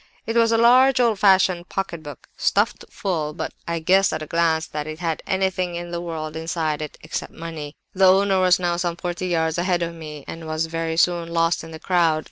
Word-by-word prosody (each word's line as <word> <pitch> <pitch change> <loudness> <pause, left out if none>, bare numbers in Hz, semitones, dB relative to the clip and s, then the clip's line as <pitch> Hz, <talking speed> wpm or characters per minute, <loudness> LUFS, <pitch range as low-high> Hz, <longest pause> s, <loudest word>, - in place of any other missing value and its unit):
"It 225 - -3
was 230 -1 +4
a 225 - +3
large 255 +3 +5
old 230 -5 +2
fashioned 185 -3 +3
pocket 190 -4 -3
book, 145 -4 -10
stuffed - - +1
full; 160 -6 -2
but - - -4
I 170 0 -1
guessed, 190 +4 +3
at 155 0 -3
a - - -6
glance, 160 0 +1
that 150 0 -5
it 155 0 -6
had 165 -2 -2
anything 190 -2 0
in 175 0 -6
the 170 0 -3
world 160 -2 -5
inside 160 -2 -2
it, 150 - -6
except 155 - -5
money. 160 -3 -7 0.2
"The 190 0 +4
owner 195 0 +3
was 185 -1 +5
now 175 -1 -1
some 175 -1 -1
forty 175 +1 -4
yards 160 -1 0
ahead 175 -1 +1
of 170 0 -4
me, 150 -3 -9
and 165 -1 -7
was 155 +1 -1
very 165 0 -3
soon 170 -1 +2
lost 165 0 +1
in 160 - -9
the 160 - -8
crowd. 170 -3 +2
170 Hz, 220 wpm, -22 LUFS, 160-185 Hz, 0.2 s, large